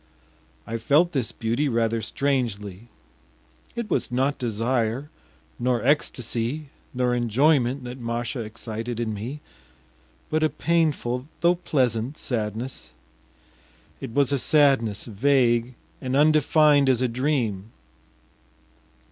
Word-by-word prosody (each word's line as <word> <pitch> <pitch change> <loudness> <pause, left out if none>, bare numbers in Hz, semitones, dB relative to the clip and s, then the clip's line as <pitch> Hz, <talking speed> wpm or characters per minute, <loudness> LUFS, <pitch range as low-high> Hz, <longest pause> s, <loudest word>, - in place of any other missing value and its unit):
I 115 0 -4
felt 160 +8 +3
this 130 -8 -1
beauty 120 +6 -1
rather 115 -1 0
strangely. 115 -5 -2 0.9
It 235 -2 -3
was - - -1
not 135 +3 0
desire, 120 +4 -1 0.5
nor 120 -2 0
ecstacy, 130 0 0 0.2
nor 125 -1 0
enjoyment 125 +2 +2
that 125 +1 -7
Masha 120 +1 -3
excited 115 +1 -5
in 115 -2 -2
me, 120 +9 -6 0.9
but 155 - +1
a 155 - +3
painful 150 -5 0
though 170 +1 +5
pleasant 130 -5 -1
sadness. 110 - -4 1.1
It - - -6
was 140 +2 +2
a 140 - +2
sadness 130 -9 +3
vague 120 +1 +2 0.3
and 130 0 -2
undefined 150 -1 +4
as 130 -2 +2
a - - +3
dream. 115 -5 -1
125 Hz, 110 wpm, -24 LUFS, 115-145 Hz, 1.1 s, though